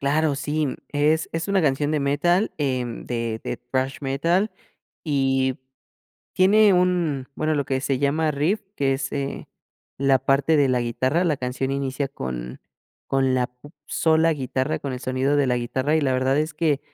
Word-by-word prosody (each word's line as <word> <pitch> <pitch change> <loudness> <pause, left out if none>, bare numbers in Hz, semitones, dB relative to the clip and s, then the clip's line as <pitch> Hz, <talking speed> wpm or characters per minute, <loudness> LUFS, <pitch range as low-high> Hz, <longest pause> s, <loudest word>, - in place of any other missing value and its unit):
Claro 145 +1 +1
sí, 150 +2 -2
em, 135 - -1
es 150 +2 +1
es 165 0 -2
una 200 -1 +3
canción 145 -1 +1
de 155 - 0
metal, 175 +8 +2
em, 130 -5 -2
de, 115 -2 -3 0.3
thrash 130 0 -1
metal 165 +9 +1 0.5
y 135 -2 +1 0.8
tiene 200 +2 +5
un 175 -7 +1
bueno 155 0 0
lo 145 - 0
que 135 -1 -1
se 135 -1 -1
llama 155 +3 +1
riff, 150 +9 0 0.2
que 135 -1 +1
es 135 0 -3
eh, 140 -1 -4 0.5
la 135 -1 +3
parte 140 +5 +2
de 140 -2 +4
la 125 -1 +2
guitarra, 130 +8 0
la 155 -5 +1
canción 130 +1 -2
inicia 135 0 -2
con 65 - -6 0.5
con 135 -1 +1
la 125 -1 +1
pu 125 +4 -17
sola 160 0 +3
guitarra, 130 +2 -2
con 140 -2 -4
el 125 - -5
sonido 130 +3 0
de 145 -1 +3
la 125 -1 +1
guitarra. 130 +5 0
Y 160 - +1
la 135 -2 +1
verdad 130 +1 +1
es 155 +2 -1
que 150 -4 0
140 Hz, 175 wpm, -23 LUFS, 130-155 Hz, 0.8 s, tiene